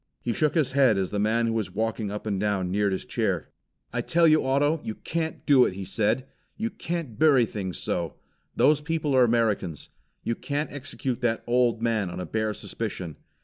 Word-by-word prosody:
He 120 - -2
shook 150 +5 +1
his 150 -6 +2
head 130 -6 +4
as 95 -1 -1
the 105 - -1
man 110 +3 +2
who 115 - 0
was 110 -4 -2
walking 110 -1 -1
up 105 +2 -5
and 100 -3 -1
down 100 -3 0
neared 100 +1 +1
his 95 - -3
chair. - - -1 0.4
"I - - 0
tell 170 0 +3
you, 155 0 +5
Otto, 145 +4 +2
you 110 - -4
can't 160 -1 -4
do 140 -4 +6
it," - - +1
he 95 0 -5
said. 110 +6 0 0.3
"You 225 +2 -2
can't 165 -10 -5
burry 140 -6 +6
things 95 -5 -5
so. 85 -3 -2 0.4
Those 150 0 +4
people 150 -2 -1
are 130 - +6
Americans. 110 -9 0 0.3
You 115 - 0
can't 145 +5 -3
execute 135 -2 -4
that 115 -2 0
old 120 -1 +2
man 110 -5 +1
on 85 - -6
a 90 - -3
bare 110 -1 -1
suspicion. 95 -8 -5
115 Hz, 200 wpm, -26 LUFS, 105-145 Hz, 0.4 s, do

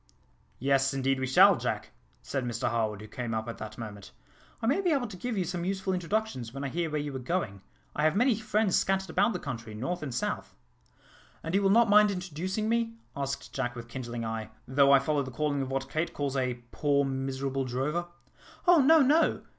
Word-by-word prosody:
"Yes, 135 +1 +2
indeed 135 0 +1
we 130 - -1
shall, 130 - +7
Jack," - - -3 0.3
said 135 -2 -2
Mr 120 -1 -1
Harwood, 110 -3 -1
who 105 - -9
came 120 0 -4
up 110 +1 -3
at 115 - -6
that 110 0 -7
moment. 105 -4 -8 0.5
"I - - -4
may 280 +11 +2
be 365 - +1
able 275 -6 +2
to 210 -5 -8
give 230 +4 -3
you 185 - +1
some 175 0 -3
useful 190 +1 -1
introductions, 180 - -2
when 135 +2 -6
I 140 - -2
hear 170 +2 -1
where 150 0 -1
you 145 -2 -4
are - - -3
going. 125 - -2 0.3
I - - -1
have 155 - +3
many 245 +3 +4
friends 215 -2 +1
scattered 190 0 +1
about 230 - +3
the - - -1
country, 115 -8 -6
north 175 +11 -3
and 145 -4 -4
south." 120 - -3 0.9
"And 165 - -4
you 200 - +3
will 195 - +3
not 230 +3 +5
mind 210 0 +6
introducing 185 +2 -3
me," 230 0 0 0.2
asked 140 0 -4
Jack 125 -2 -2
with 120 -1 -8
kindling 120 -2 -5
eye, 110 -1 -4 0.2
"though 140 +1 +4
I 140 - +9
follow 145 +2 +1
the 130 - -5
calling 145 +1 -1
of 130 - -3
what 135 0 -2
Kate 155 +4 -2
calls 140 -2 -2
a 125 -2 0 0.2
poor, 140 -2 +2
miserable 135 0 -2
drover?" 145 +8 -2 0.6
"Oh, 350 -3 +7
no, 310 +2 +6
no!" 300 +5 +3
140 Hz, 215 wpm, -29 LUFS, 130-190 Hz, 0.9 s, I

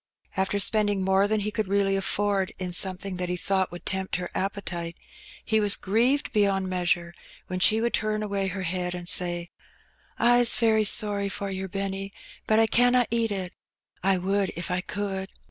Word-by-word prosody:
After 190 +1 0
spend 210 +1 +2
ing 195 -2 -1
more 190 +1 +3
than 215 0 +1
he 210 +1 -2
could 215 -1 -2
really 195 0 +1
afford 195 0 0
in 180 -1 -3
something 190 +1 +1
that 180 -1 -3
he 180 - -1
thought 190 +1 0
would 175 - -9
tempt 190 0 -2
her 180 0 -4
appetite, 180 -4 -4 0.5
he 220 -1 +2
was 205 -1 +4
grieved 240 +8 +1
beyond 195 -2 +2
measure 175 -1 0 0.3
when 185 0 -4
she 215 +4 +5
would 235 +1 0
turn 215 0 0
away 200 -2 -1
her 190 0 -4
head 180 0 -2
and 175 -1 -7
say 175 -2 0 0.3
— - - -33
"Fs 240 0 +4
very 220 -2 +3
sorry 205 -2 +2
for 200 0 -4
yer, 190 0 -4
Benny, 195 0 -4 0.4
but 215 - +3
I 225 - +5
canna 245 +2 +4
eat 230 -1 +1
it; 185 -3 -4 0.5
I 195 0 +3
would 195 +1 0
if 170 +2 -3
I 180 0 0
could. 195 -1 -4
195 Hz, 190 wpm, -26 LUFS, 185-210 Hz, 0.5 s, she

